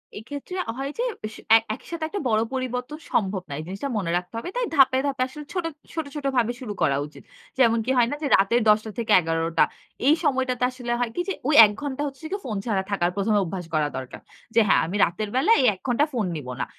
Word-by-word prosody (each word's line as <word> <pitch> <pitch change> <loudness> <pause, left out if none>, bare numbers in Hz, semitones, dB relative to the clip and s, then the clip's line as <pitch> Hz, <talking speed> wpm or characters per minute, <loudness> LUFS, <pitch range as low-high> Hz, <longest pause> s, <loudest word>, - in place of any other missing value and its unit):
এক্ষেত্রে 285 - -7 0.2
হয় 275 +1 -3
যে, 480 - 0 0.3
সে - - -12
এ - - +10 0.2
একইসাথে 325 +5 -7
একটা 405 - -4
বড় 215 0 +3
পরিবর্তন 255 +2 -3
সম্ভব 195 -3 0
না। - - -5
এই - - -5
জিনিসটা 200 +9 -4
মনে 185 -5 -1
রাখতে 180 +3 -6
হবে। 235 - -4
তাই - - 0
ধাপে, 265 -2 +5
ধাপে 270 -2 -2
আসলে 295 +2 -10
ছোট, 355 -3 -2 0.3
ছোট, 320 -2 -3
ছোটভাবে 265 -5 0
শুরু 215 -5 -5
করা 135 -1 +3
উচিত। 150 - -14 0.4
যেমন 230 -2 +5
কি 260 - +1
হয় 240 -1 +5
না 290 - -1
যে, 290 - -1
রাতের 215 +5 +2
১০ঃ০০-১১ঃ০০ 185 -7 +2 0.4
এই 305 - +7
সময়টাতে 260 -3 0
আসলে 245 -2 -5
হয় 245 -2 0
কি 355 - 0
যে, - - 0
ওই 300 - +3
১ 210 - 0
ঘণ্টা 285 -1 -3
হচ্ছে 275 +2 -10
কি 400 - -1
ফোন 215 -5 -3
ছাড়া 200 -4 0
থাকার 175 -3 +1
প্রথমে 205 +1 +2
অভ্যাস 180 0 -5
করা 150 -1 +2
দরকার। 130 -1 -8 0.3
যে - - +7
হ্যাঁ, - - +5
"আমি 180 +5 -4
রাতের 205 +5 -4
বেলা 275 +12 +3
এই 255 - +3
১ 185 - -14
ঘণ্টা 255 +5 +3
ফোন 225 -4 0
নিব 145 -4 -6
না।" - - 0
240 Hz, 220 wpm, -24 LUFS, 195-275 Hz, 0.4 s, এ